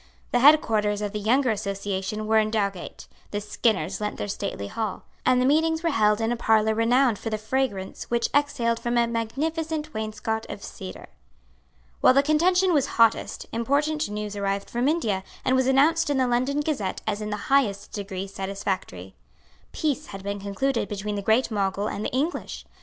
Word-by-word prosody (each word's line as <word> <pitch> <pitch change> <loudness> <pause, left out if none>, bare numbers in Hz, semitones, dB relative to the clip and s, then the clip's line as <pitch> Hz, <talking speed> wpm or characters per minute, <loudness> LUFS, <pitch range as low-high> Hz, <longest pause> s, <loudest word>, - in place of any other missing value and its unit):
The 245 - +3
headquarters 215 -7 +4
of 205 - -2
the 210 - -3
younger 245 +4 +2
association 200 0 -3
were 220 +1 +4
in 215 0 +1
Dowgate; 200 -4 -3 0.2
the 205 - -2
Skinners 205 -3 -1
lent 210 0 -3
their - - -3
stately 200 - -4
hall; 215 - -4 0.2
and 255 -1 +5
the 250 - +2
meetings 320 +3 +2
were 335 - +2
held 210 -4 +3
in 225 +1 0
a - - +1
parlour 220 -2 +3
renowned 235 +1 +3
for 225 - -4
the 215 - -1
fragrance 215 -4 -2
which 235 0 +1
exhaled 235 -5 +1
from 240 0 -1
a 235 - +4
magnificent 305 +7 -2
wainscot 220 +1 -3
of 200 - -7
cedar. 190 -1 -8 0.9
While 255 - +5
the 275 - +5
contention 360 +5 +3
was 285 -3 +2
hottest, 230 -2 +2
important 285 +5 0
news 210 0 -4
arrived 200 0 -2
from 240 +2 0
India, 225 - 0 0.2
and 260 - +3
was 260 0 +2
announced 300 +5 +3
in 285 - +1
the 260 - +3
London 255 +4 +1
Gazette 270 -11 -2
as 205 - -2
in 210 - -3
the 210 - -2 0.2
highest 205 -8 +2
degree 195 -2 -5
satisfactory. 190 - -4 0.6
Peace 300 -1 -1
had 195 -1 -8
been 200 0 -3
concluded 205 +4 -1
between 205 0 -3
the 200 - -2
great 220 +5 +2
Mogul 200 -1 0
and 210 - -4
the - - -1
English. 290 +7 -3
220 Hz, 180 wpm, -25 LUFS, 205-270 Hz, 0.9 s, and